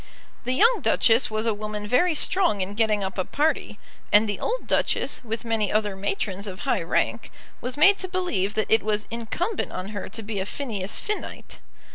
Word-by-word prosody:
The 250 - 0
young 465 - +4
Duchess 230 +2 +4
was 215 +1 -2
a 225 - +2
woman 210 0 -5
very 325 +9 +3
strong 350 - +4
in 190 +2 -3
getting 215 -2 +1
up 190 0 -4
a - - +2
party; 290 - -1 0.3
and 210 +2 +6
the 205 -2 -3
old - - -2
Duchess, - - 0
with 225 0 -5
many 220 -3 0
other 210 -2 0
matrons 195 0 -3
of 190 0 -7
high - - 0
rank, 195 +6 -1 0.3
was 250 +3 -4
made 390 +7 +6
to 375 - -3
believe 350 - -1
that 215 - -1
it 220 - +5
was 210 0 -1
incumbent 275 - -3
on 185 +2 -5
her 205 -2 -6
to 220 +3 -6
be 210 -1 -4
a 190 - -2
Phineas 210 -9 -4
Finnite. 425 0 -5
220 Hz, 195 wpm, -25 LUFS, 205-260 Hz, 0.3 s, and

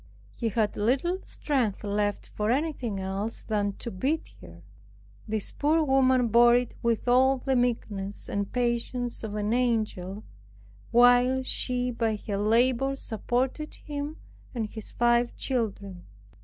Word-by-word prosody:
He 230 - -2
had 215 0 0
little 270 - +1
strength 250 -10 -1
left 205 0 -1
for 210 0 -2
anything 255 -6 -1
else 195 +4 -3
than 205 -2 -1
to 235 - -7
beat 275 +12 -2
her. - - -13 0.6
This 215 -1 -2
poor 310 +2 +2
woman 260 -3 +3
bore 235 +2 +6
it 245 -1 0
with 235 0 0
all 260 +2 +4
the 265 +1 -1
meekness 210 -5 -2
and 200 -1 -2
patience 240 0 -1
of 210 -1 -4
an 210 +1 0
angel, 215 -5 -1 0.7
while 245 +2 +5
she 250 -1 0
by 230 -2 0
her 205 -1 -4
labor 245 +6 +2
supported 255 +5 -2
him 290 +1 -6 0.4
and 230 -2 -1
his 220 0 -9
five 240 0 +2
children. 200 -7 -3
235 Hz, 135 wpm, -27 LUFS, 210-255 Hz, 0.7 s, bore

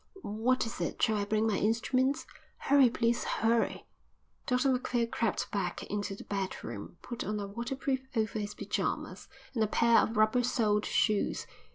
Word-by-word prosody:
"What 230 +5 +1
is 225 - -6
it? - - -2
Shall 220 -3 +3
I 200 - 0
bring 215 +1 +1
my 215 -3 +1
instruments?" 255 +6 +1 0.3
"Hurry, 275 -2 +5
please, 235 0 +1
hurry." 225 +1 +1 0.6
Dr 250 +2 +3
Macphail 245 -2 0
crept 230 -2 -1
back 190 -4 -2
into 205 -1 -2
the - - -10
bedroom, 175 - -5
put 240 0 -5
on 210 0 -2
a 200 - -3
waterproof 260 +5 -3
over 220 -1 0
his 210 0 -4
pyjamas, - - -3 0.3
and 225 -4 +1
a - - +2
pair 230 +2 +4
of 220 - 0
rubber 215 +3 +4
soled 215 -4 +1
shoes. 215 -2 +1
225 Hz, 165 wpm, -31 LUFS, 210-245 Hz, 0.6 s, Hurry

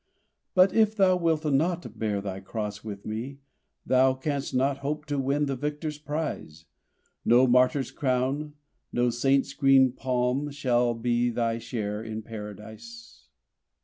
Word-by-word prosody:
"But 185 +1 +5
if 220 -1 +3
thou 190 -3 +4
wilt 165 -3 0
not 165 +5 0
bear 105 -2 -1
thy 95 -1 -5
cross 105 +1 -5
with 100 -2 -7
Me 115 +6 -5 0.5
Thou 130 0 +4
canst 140 +1 -3
not 135 +2 +1
hope 150 +2 -3
to 145 -2 -2
win 140 +2 +1
the 140 -1 -2
victor's 150 +2 -4
prize; 150 - -5 0.6
No 120 +2 +5
martyr's 125 +1 +3
crown, 135 +3 -1 0.4
no 120 0 +1
saint's 135 +3 +1
green 135 -2 +5
palm 130 +2 -1
shall 125 -4 +1
be 120 +1 +1
Thy 115 -1 -1
share 105 -3 -4
in 110 -1 -6
Paradise!" 110 - -10
130 Hz, 140 wpm, -27 LUFS, 115-145 Hz, 0.6 s, But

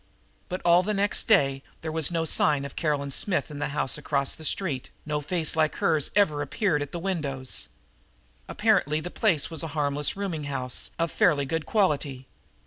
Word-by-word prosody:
But 185 - -4
all 175 +1 +6
the 210 +3 -1
next 200 +1 +1
day 135 -11 +4 0.2
there 160 - -3
was 160 -3 +2
still 165 -1 +1
no - - -1
sign 150 -2 +2
of 140 - -8
Caroline 145 -3 -1
Smith 180 +2 0
in 145 - -7
the 150 - -1
house 145 -2 -1
across 140 -2 0
the 160 - -8
street; 150 -5 -2 0.2
no 150 -1 -1
face 160 +1 0
like 155 -1 +2
hers 155 -3 +1
ever 155 -8 +3
appeared 165 -2 0
at 145 - -4
the - - -4
windows. 140 - -3 0.8
Apparently 150 +2 +2
the 175 +3 -6
place 170 -9 +1
was 160 -3 -3
a 165 - -3
harmless 145 +2 0
rooming 175 -7 -3
house 130 -3 -2
of 165 -1 0
fairly 145 -5 +3
good 160 +3 -3
quality. 145 - +1
150 Hz, 190 wpm, -26 LUFS, 140-175 Hz, 0.8 s, all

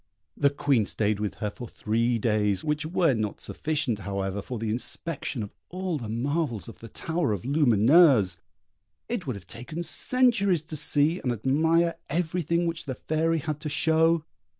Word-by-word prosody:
The 140 - +3
Queen 140 -6 +1
stayed 105 -1 0
with 105 -1 -3
her 105 -1 -3
for 120 +3 -8
three 115 +2 0
days, 105 -3 +1
which 150 0 -1
were 165 -3 +2
not 110 -3 -2
sufficient, 145 -8 -2
however, 100 0 -3
for 125 +5 -6
the 110 -1 -2
inspection 125 +1 -3
of 100 - -9 0.2
all 180 -3 -3
the 115 -4 -6
marvels 125 - -2
of 115 - -11
the 115 - -10
tower 160 -5 -1
of 100 - -4
Lumineuse; 130 - +5 0.7
it 235 -10 -3
would 130 - -2
have 100 -3 -10
taken 125 - -6
centuries 200 - +2
to 160 0 -7
see 150 +3 +2
and 125 - -1
admire 160 +8 +2
everything 170 +1 0
which 165 -2 -3
the 130 -3 -4
Fairy 160 +4 0
had 150 -1 -3
to 150 - -4
show. 160 +2 +2
145 Hz, 170 wpm, -26 LUFS, 110-165 Hz, 0.7 s, Lumineuse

